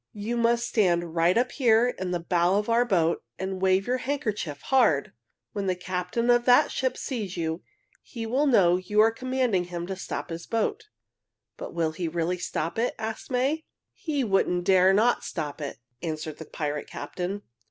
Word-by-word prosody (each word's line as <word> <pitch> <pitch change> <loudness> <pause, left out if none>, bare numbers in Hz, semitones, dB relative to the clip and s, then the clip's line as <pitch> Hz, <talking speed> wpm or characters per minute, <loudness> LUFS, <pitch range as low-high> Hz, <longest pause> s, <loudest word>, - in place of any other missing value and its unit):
"You 215 +2 -3
must 235 0 +2
stand 175 -6 +1
right 170 +4 +3
up 245 +1 +2
here 240 -3 +4
in 185 -6 -4
the 175 -1 -1
bow 175 +2 +2
of 210 +2 -1
our 235 +1 +4
boat 170 -7 +1
and 190 0 -4
wave 190 0 +3
your 250 +1 0
handkerchief 215 - -3
hard. 225 - +3 0.4
When 200 -1 -2
the 185 - +1
captain 180 +6 -1
of 240 0 +3
that 250 +4 +5
ship 260 -1 -1
sees 210 -9 -4
you, 160 0 -2 0.4
he 230 -3 -7
will 265 +6 +1
know 180 -9 +5
you 195 +3 -1
are 220 +1 +6
commanding 250 -6 0
him 175 -1 -5
to 190 +1 -4
stop 185 - -5
his 165 0 -6
boat." 410 - -1 0.7
"But - - -8
will 165 -2 +1
he 170 +2 -3
really 170 +2 -1
stop 165 +3 -3
it?" 240 - 0
asked 220 0 -5
May. 270 +5 0 0.3
"He 290 -4 -2
wouldn't 195 -4 +1
dare 185 0 +5
not 220 +5 +3
to - - -7
stop 150 -3 -5
it," 145 - -5 0.2
answered 155 -1 -4
the 160 - -7
pirate 150 -1 -4
captain. 180 +7 -5
195 Hz, 185 wpm, -26 LUFS, 175-240 Hz, 0.7 s, are